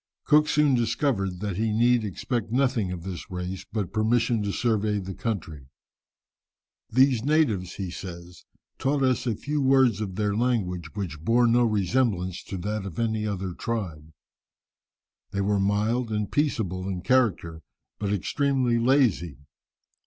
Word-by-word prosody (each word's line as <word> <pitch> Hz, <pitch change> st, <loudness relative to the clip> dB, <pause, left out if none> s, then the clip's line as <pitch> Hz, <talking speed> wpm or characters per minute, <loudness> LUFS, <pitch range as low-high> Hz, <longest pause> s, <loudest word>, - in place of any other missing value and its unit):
Cook 150 Hz, 0 st, +4 dB
soon 150 Hz, -2 st, +3 dB
discovered 115 Hz, -6 st, 0 dB
that 100 Hz, -4 st, -3 dB
he 110 Hz, +1 st, 0 dB
need 120 Hz, +2 st, +3 dB
expect 110 Hz, +3 st, -3 dB
nothing 120 Hz, -7 st, +1 dB
of 90 Hz, -2 st, -6 dB
this 90 Hz, -2 st, -7 dB
race 90 Hz, +1 st, -5 dB
but 105 Hz, -5 st, -3 dB
permission 115 Hz, +1 st, +2 dB
to 100 Hz, -1 st, -1 dB
survey 110 Hz, -2 st, 0 dB
the 95 Hz, -1 st, -5 dB
country. 80 Hz, -, -4 dB, 1.2 s
"These 130 Hz, -1 st, +3 dB
natives," 125 Hz, -, +1 dB
he 95 Hz, -3 st, -4 dB
says, 85 Hz, -1 st, -9 dB, 0.4 s
"taught 140 Hz, +1 st, +1 dB
us 130 Hz, -2 st, +1 dB
a 115 Hz, -, +1 dB
few 145 Hz, +6 st, -2 dB
words 130 Hz, -5 st, +4 dB
of 95 Hz, -3 st, -4 dB
their 105 Hz, 0 st, 0 dB
language, 100 Hz, -8 st, -1 dB
which 90 Hz, -7 st, -4 dB
bore 120 Hz, +5 st, +4 dB
no 120 Hz, +1 st, +4 dB
resemblance 100 Hz, -3 st, 0 dB
to 95 Hz, -, -5 dB
that 105 Hz, +3 st, -3 dB
of 95 Hz, -5 st, -7 dB
any 110 Hz, -2 st, 0 dB
other 95 Hz, -3 st, -3 dB
tribe. 85 Hz, -9 st, -4 dB, 1.2 s
They 100 Hz, -, -2 dB
were 100 Hz, +1 st, +1 dB
mild 110 Hz, +4 st, 0 dB
and 105 Hz, -1 st, -2 dB
peaceable 110 Hz, -, -1 dB
in 90 Hz, -2 st, -3 dB
character, 95 Hz, -9 st, +1 dB, 0.4 s
but 100 Hz, -1 st, -1 dB
extremely 130 Hz, +3 st, +1 dB
lazy. 115 Hz, -, +2 dB
105 Hz, 145 wpm, -26 LUFS, 95-120 Hz, 1.2 s, Cook